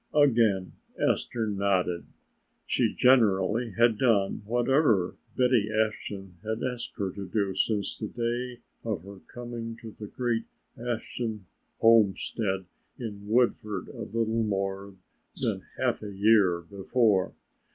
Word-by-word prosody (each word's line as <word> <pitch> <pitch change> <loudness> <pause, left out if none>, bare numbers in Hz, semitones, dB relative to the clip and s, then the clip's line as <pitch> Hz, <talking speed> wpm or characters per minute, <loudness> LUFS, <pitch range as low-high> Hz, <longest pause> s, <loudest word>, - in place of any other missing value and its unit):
Again 115 -10 +4 0.3
Esther 115 -2 0
nodded. 95 -4 0 0.6
She - - +1
generally 115 -2 +4
had 115 -2 +4
done 105 -7 +2
whatever 120 - +2 0.2
Betty 125 -4 +3
Ashton 105 -4 -2
had 110 +1 -3
asked 125 -1 -4
of 95 -2 -2 0.2
her 100 -3 +1
since 100 +1 0
the 110 - -3
day 120 +2 -3 0.2
of 105 -7 -3
her 100 0 -11
coming 120 -2 -6
to 115 -1 -9
the 105 - -6
great 120 0 -1 0.3
Ashton 115 -3 -4 0.4
homestead 105 -3 +3 0.3
in 105 -4 -7
Woodford 110 -4 +1
a - - -8
little 115 0 0
more 100 -2 -2 0.4
than - - 0 0.2
half - - 0
a 105 - -6
year 100 -3 +4
before. 100 +2 +1
110 Hz, 120 wpm, -28 LUFS, 100-120 Hz, 0.6 s, Again